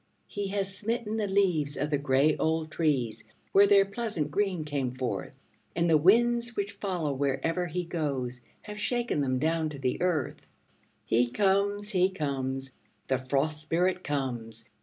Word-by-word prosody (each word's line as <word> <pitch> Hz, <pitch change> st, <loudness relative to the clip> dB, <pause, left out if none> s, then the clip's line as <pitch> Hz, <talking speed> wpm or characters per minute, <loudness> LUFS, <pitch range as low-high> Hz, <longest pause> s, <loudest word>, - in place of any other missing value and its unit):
He 205 Hz, -1 st, -4 dB
has 195 Hz, -1 st, -2 dB
smitten 225 Hz, +1 st, -2 dB
the 210 Hz, -2 st, 0 dB
leaves 180 Hz, -7 st, +1 dB
of 145 Hz, +2 st, -2 dB
the 145 Hz, -, +2 dB
gray 140 Hz, +2 st, +3 dB
old 160 Hz, 0 st, -1 dB
trees 140 Hz, -9 st, 0 dB, 0.3 s
where 200 Hz, +1 st, +6 dB
their 200 Hz, -1 st, +6 dB
pleasant 200 Hz, -8 st, -3 dB
green 185 Hz, -3 st, 0 dB
came 135 Hz, -4 st, -2 dB
forth, 130 Hz, -1 st, -3 dB, 0.4 s
And 170 Hz, +1 st, +2 dB
the 165 Hz, -, +5 dB
winds, 235 Hz, +8 st, +4 dB
which 200 Hz, 0 st, -2 dB
follow 180 Hz, -8 st, -2 dB
wherever 140 Hz, +6 st, -1 dB
he 175 Hz, +2 st, -3 dB
goes, 135 Hz, -7 st, -3 dB, 0.2 s
have 210 Hz, 0 st, -8 dB
shaken 240 Hz, -, 0 dB
them 130 Hz, -2 st, 0 dB
down 160 Hz, +2 st, 0 dB
to 135 Hz, -4 st, -3 dB
earth. 170 Hz, -7 st, -1 dB, 0.6 s
He 120 Hz, +1 st, +2 dB
comes, 200 Hz, -, +1 dB
he 185 Hz, -1 st, +3 dB
comes, 135 Hz, -6 st, -3 dB, 0.4 s
the 130 Hz, -1 st, +2 dB
Frost 140 Hz, +4 st, 0 dB
Spirit 180 Hz, +4 st, 0 dB
comes! 120 Hz, -6 st, -3 dB
160 Hz, 155 wpm, -28 LUFS, 140-195 Hz, 0.6 s, where